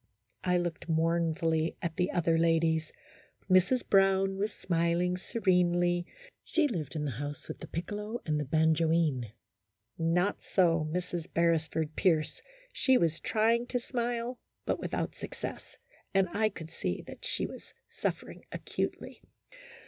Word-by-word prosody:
I 180 -1 +3
looked 175 -1 -3
mournfully 165 0 +1
at 165 -2 -3
the 180 +2 +1
other 165 -1 +2
ladies. 165 -1 +2 0.6
Mrs. 185 +7 +3
Brown 195 0 +4
was 210 +2 0
smiling 170 0 +1
serenely; 175 -4 +2 0.4
she 325 -3 +2
lived 165 - -4
in 150 -1 -1
the 140 - -1
house 145 +5 -5
with - - -7
the - - -8
piccolo 210 +7 -4
and 150 -1 0
the - - 0
ban 160 +3 +3
joine. 155 -8 +1 0.7
Not 175 +4 +1
so 165 -4 +2
Mrs. 175 -1 -3
Beresford 160 -2 +1
Pierce; 160 -5 +1 0.3
she 260 -2 +4
was 165 -4 +1
trying 230 +2 +2
to 245 - -1
smile, 240 0 -2 0.3
but - - 0
without - - -2
success, - - -7 0.4
and 195 -1 +4
I 215 +4 +1
could 165 -5 -9
see 90 - -3
that - - -11
she - - -1
was - - -10
suffering - - -4
acutely. - - -4
170 Hz, 140 wpm, -31 LUFS, 160-195 Hz, 0.7 s, Brown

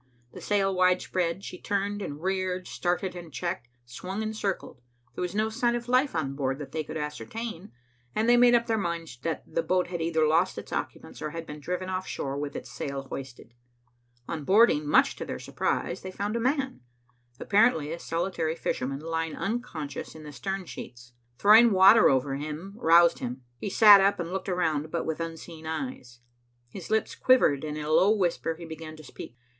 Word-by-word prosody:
The - - -9
sail 195 -2 +1
widespread, 185 -1 +1
she 180 - -8
turned 205 +1 -1
and 150 -4 -6
reared, 185 -1 -1
started 180 +1 -2
and 170 -2 -9
checked, 175 -3 -4 0.2
swung 185 - -5
and 220 0 -3
circled. 195 - -3 0.3
There - - -6
was 180 +1 -3
no 215 +1 +1
sign 235 +2 +1
of 240 0 -4
life 255 +1 +2
on 140 -4 -1
board 135 -1 -1
that 145 -1 -8
they 160 -1 -2
could 155 - -6
ascertain, 165 - -6 0.4
and 220 - +1
they 240 - +6
made 240 0 +6
up 235 0 +2
their 225 -2 0
minds 170 -8 -4
that 165 +2 -3
the 165 - -1
boat 180 +1 0
had 175 -2 -4
either 160 -1 +2
lost 165 +5 +2
its - - -7
occupants - - -5
or 150 - -3
had 165 +2 -6
been 150 -1 -8
driven 180 +4 -3
offshore 185 -7 -3
with 145 0 -4
its - - -7
sail 140 -1 -4
hoisted. 125 -3 -8 0.7
On 160 -3 -4
boarding, 190 -4 +4
much - - +4
to - - -4
their - - -5
surprise, - - -2
they 185 - -6
found 205 +3 -3
a - - 0
man, 265 +2 0 0.6
apparently 200 -8 +3
a 170 - -6
solitary 165 -1 -2
fisherman, 135 -3 -3
lying 165 0 -3
unconscious 170 - -4
in 155 - -10
the 150 -1 -9
stern 195 +5 -4
sheets. 120 -6 -10 0.2
Throwing 220 - +7
water 195 +4 +7
over 135 +1 +1
him 155 +6 -6
roused 170 -3 +5
him. 125 +1 -5 0.2
He 205 - -3
sat 205 0 +8
up 200 0 +2
and 175 +1 -4
looked 190 0 -3
around, 160 -4 0
but 170 +1 -2
with 160 0 -3
unseeing 165 -1 -7
eyes. 160 - -5 0.5
His 175 +7 -9
lips 220 0 +1
quivered, 240 - +3
and 150 -1 -4
in 150 - -4
a 155 - -2
low 185 +5 +5
whisper 175 -5 +1
he 170 +1 -9
began 160 -1 -8
to 155 - -13
speak. 125 -3 -10
170 Hz, 195 wpm, -27 LUFS, 150-200 Hz, 0.7 s, sat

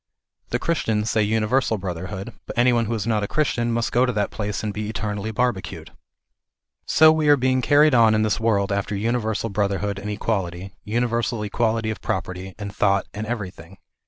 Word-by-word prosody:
The - - 0
Christians 110 -10 0
say 110 - +2
universal 110 +3 +1
brotherhood; 95 +3 -5
but - - -7
any 120 +1 +4
one 115 -1 +2
who 115 - -2
is 105 -3 -3
not 110 -2 +1
a 105 - -2
Christian 120 -5 0
must 115 0 -1
go 125 - +3
to 125 - +2
that 105 -2 -1
place 105 -1 -3
and 105 -1 -2
be 105 0 -4
eternally 105 -1 -3
barbecued. 110 -4 -2 1.0
So 155 0 +6
we 155 -1 +1
are 145 - +7
being 130 0 +1
carried 145 +3 +5
on 115 -3 +5
in 110 - +2
this 110 0 0
world 105 -3 +1
after 100 +1 -1
univer 110 +1 -1
sal 115 - -3
brotherhood 100 0 -1
and 100 +2 -6
equality, 95 -3 -3
universal 115 0 -1
equality 110 +1 0
of 110 - -7
property 95 +1 -4
and 100 -1 -7
thought, 100 -1 +2
and 105 +1 -5
everything. 95 -5 -6
110 Hz, 190 wpm, -23 LUFS, 100-120 Hz, 1.0 s, are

